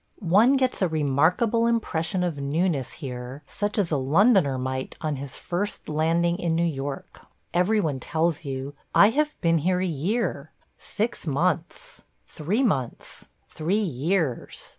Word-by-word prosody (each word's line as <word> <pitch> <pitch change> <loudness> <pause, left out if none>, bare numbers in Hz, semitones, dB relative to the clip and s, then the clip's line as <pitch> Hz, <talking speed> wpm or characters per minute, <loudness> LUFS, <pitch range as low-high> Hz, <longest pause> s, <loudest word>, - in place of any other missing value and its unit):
One 230 +7 +6
gets 260 -4 0
a 185 - +4
remarkable 160 - +2
impression 185 -6 0
of 165 -5 -2
newness 145 -1 0
here 130 0 -7
such 205 +5 -3
as 195 -6 +1
a 150 - +2
Londoner 150 - +3
might 130 +1 -3
on 155 -3 -2
his 135 0 -7
first 195 +4 -4
landing 165 +3 +1
in 170 -3 0
New 170 - +2
York. 140 -3 -5 0.3
Every 180 +5 +3
one 150 -9 -1
tells 160 +3 -1
you, 135 0 -5 0.2
"I 205 +2 +7
have 300 +4 -1
been 165 -2 +3
here 180 +4 +1
a 185 - 0
year 165 - -2 0.2
– - - -43
six 220 -3 -3
months 170 - -1
– - - -45
three 190 - -1
months 135 - -2
– - - -43
three 165 +6 -1
years." 160 - -1
165 Hz, 160 wpm, -25 LUFS, 140-200 Hz, 0.3 s, I